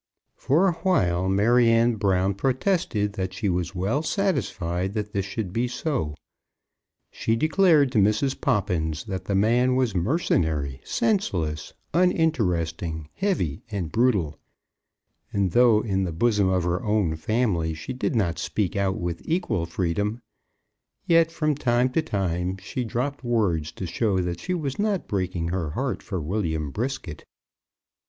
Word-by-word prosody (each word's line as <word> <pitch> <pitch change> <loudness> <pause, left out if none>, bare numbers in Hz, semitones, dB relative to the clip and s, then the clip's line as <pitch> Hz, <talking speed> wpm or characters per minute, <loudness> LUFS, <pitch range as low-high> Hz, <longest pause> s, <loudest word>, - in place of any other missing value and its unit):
For 160 +9 +2
awhile 115 - +1
Maryanne 115 +3 +4
Brown 95 -1 +2
protested 125 - 0
that 95 -2 -4
she 100 +1 -1
was 90 +1 -2
well 100 +11 0
satisfied 100 - -1
that 105 -1 -4
this 100 -1 -1
should 100 -3 -4
be 120 +3 0
so. 120 - -2 1.0
She 115 - 0
declared 155 0 +4
to 110 - +2
Mrs. 110 +7 +1
Poppins 80 -6 0
that 95 -1 -5
the 100 - -1
man 120 +5 +3
was 130 -4 +1
mercenary, 80 - 0
senseless, 95 - -1 0.2
uninteresting, 90 - 0
heavy, 135 - -1
and 95 -7 -3
brutal; 105 - +1 0.9
and 100 -3 0
though 120 0 +5
in 95 -4 0
the 90 - -2
bosom 100 +2 +2
of 90 -2 +1
her 90 +1 0
own 105 -6 +1
family 85 -3 0
she 105 +11 -6
did 130 +1 -2
not 85 -7 0
speak 95 +3 -1
out 100 -1 0
with 85 -1 -3
equal 115 - -1
freedom, 100 +6 -1 0.9
yet 165 -1 +4
from 155 -2 0
time 125 -2 +1
to 160 - +2
time 95 - -2
she 100 +7 -4
dropped 130 +5 -3
words 95 -11 0
to 95 - -5
show 95 +3 0
that 90 -1 -2
she 180 - -2
was 145 -3 -3
not 205 -3 0
breaking 90 -4 -2
her 85 -3 -2
heart 130 - -2
for 95 -5 -4
William 80 -3 -2
Brisket. 110 - -4
100 Hz, 145 wpm, -25 LUFS, 90-125 Hz, 1.0 s, though